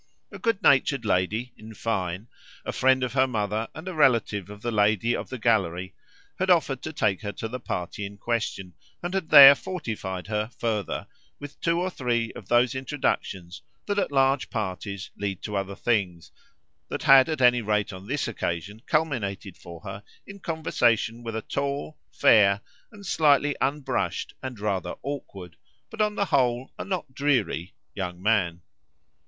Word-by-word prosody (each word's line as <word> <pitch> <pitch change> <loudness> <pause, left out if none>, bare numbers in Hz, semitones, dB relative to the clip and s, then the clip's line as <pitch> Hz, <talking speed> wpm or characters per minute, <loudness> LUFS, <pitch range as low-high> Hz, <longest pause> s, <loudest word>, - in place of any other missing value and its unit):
A - - -9
good 230 -5 0
natured 135 -2 +3
lady 105 +6 0
in 110 +1 -12
fine, 95 -2 -2 0.4
a - - -2
friend 130 0 +3
of 125 -2 -2
her 135 0 +3
mother 110 -2 -2
and 160 +3 -9
a 185 - -3
relative 115 - +2
of 105 0 -11
the 120 - -1
lady 110 +2 +2
of - - -5
the 130 - -5
gallery, 95 -6 0 0.5
had 190 +1 0
offered 145 -7 +3
to 155 - -5
take 110 - 0
her 100 - -4
to 115 - -5
the 125 +3 -6
party 90 -2 -4
in 100 0 -7
question 100 -5 -3 0.3
and 175 +1 -3
had 190 -4 -2
there 140 -2 +11
fortified 115 - -5
her, 105 +1 -2
further, 110 -5 -2 0.3
with 145 0 -10
two 170 0 +1
or 185 +1 -1
three 120 -6 -1
of 100 - -11
those 120 +2 +3
introductions 130 - -3 0.2
that, 205 0 0
at 200 - -1
large 135 0 +2
parties, 100 - -4
lead 100 -2 -4
to 105 - -4
other 100 0 -2
things 95 -9 -1 0.6
that - - -4
had 135 +2 +7
at 155 -3 -2
any 125 -1 +5
rate 105 -1 0
on 95 +1 -10
this 140 +4 -1
occasion 105 -1 -4
culminated 110 - -1
for 85 -1 -11
her 95 +2 -7 0.2
in 200 0 -11
conversation 120 - 0
with 115 -1 -5
a 110 - -3
tall 140 +2 -3
fair, 100 -2 +5 0.3
a 205 -2 -13
slightly 145 -4 +3
unbrushed 140 +1 -1
and 130 -4 -6
rather 100 -3 -2
awkward, 100 - -7 0.3
but 225 - -3
on 210 0 +1
the 200 - +1
whole 125 -5 +1
a - - -2
not 185 -8 -4
dreary, 125 - 0 0.2
young 90 -3 -5
man. 90 -5 +1
115 Hz, 170 wpm, -26 LUFS, 100-140 Hz, 0.6 s, there